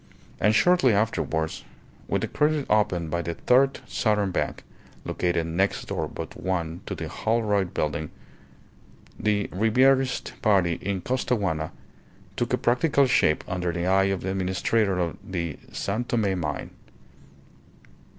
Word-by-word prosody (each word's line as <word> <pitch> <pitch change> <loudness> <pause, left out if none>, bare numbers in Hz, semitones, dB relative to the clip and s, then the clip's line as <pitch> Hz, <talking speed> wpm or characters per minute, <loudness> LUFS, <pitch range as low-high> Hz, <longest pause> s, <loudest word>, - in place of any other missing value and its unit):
And 105 +1 +3
shortly 175 -5 +4
afterwards, 90 -7 -1 0.4
with - - 0
a - - 0
credit 150 -1 +1
opened 90 -7 +1
by 85 - 0
the 85 0 -4
Third 135 +2 +3
Southern 105 -4 +1
Bank 90 - -2 0.4
(located 85 -2 0
next 90 +5 0
door - - -2
but - - -7
one 85 -3 -3
to - - -3
the - - -5
Holroyd 105 -5 0
Building), 75 0 -1 1.1
the 105 -1 +1
Ribierist 130 +6 +2
party 95 -7 +3
in 95 -1 -2
Costaguana 100 -11 -1 0.6
took 120 +1 -1
a 125 - +3
practical 135 +4 +3
shape 125 -11 +3
under 90 -1 -1
the 85 0 -2
eye 95 +1 +4
of 95 -2 -1
the 95 - -2
administrator 95 +2 +1
of 85 -2 -1
the 85 -6 -4
San 105 +5 -2
Tome 100 -6 0
mine. 75 -3 -4
100 Hz, 135 wpm, -25 LUFS, 85-115 Hz, 1.1 s, shortly